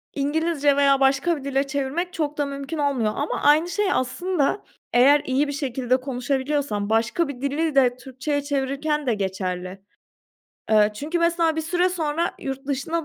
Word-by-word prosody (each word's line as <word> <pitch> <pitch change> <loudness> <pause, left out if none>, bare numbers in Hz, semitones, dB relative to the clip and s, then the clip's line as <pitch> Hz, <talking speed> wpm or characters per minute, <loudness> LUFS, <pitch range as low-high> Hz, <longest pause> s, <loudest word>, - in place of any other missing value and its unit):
İngilizce 290 0 +1
veya 275 -1 +4
başka 275 +5 +2
bir 280 - -9
dile 275 0 0
çevirmek 285 +6 -2
çok 300 -2 -2
da 290 - +1
mümkün 280 +3 -5
olmuyor 275 -7 +1
ama 290 - -2
aynı 310 +4 +4
şey 385 +2 0
aslında 320 +6 -1 0.3
eğer 275 +4 +6
iyi 270 +3 +1
bir 285 - -3
şekilde 255 -3 0
konuşabiliyorsan 260 -3 -2
başka 230 +9 +1
bir 265 -3 -7
dili 290 +2 -1
de 250 -3 +4
Türkçeye 270 +3 -3
çevirirken 285 +2 -1
de 240 - +3
geçerli. 190 -2 -4 0.9
Eee, 210 -1 +5
çünkü, 305 +10 -3
mesela, 335 -1 +2
bir - - 0
süre 355 +3 +1
sonra 335 -1 -1
yurt 270 0 -6
dışında 290 +4 -2
280 Hz, 160 wpm, -23 LUFS, 260-315 Hz, 0.9 s, eğer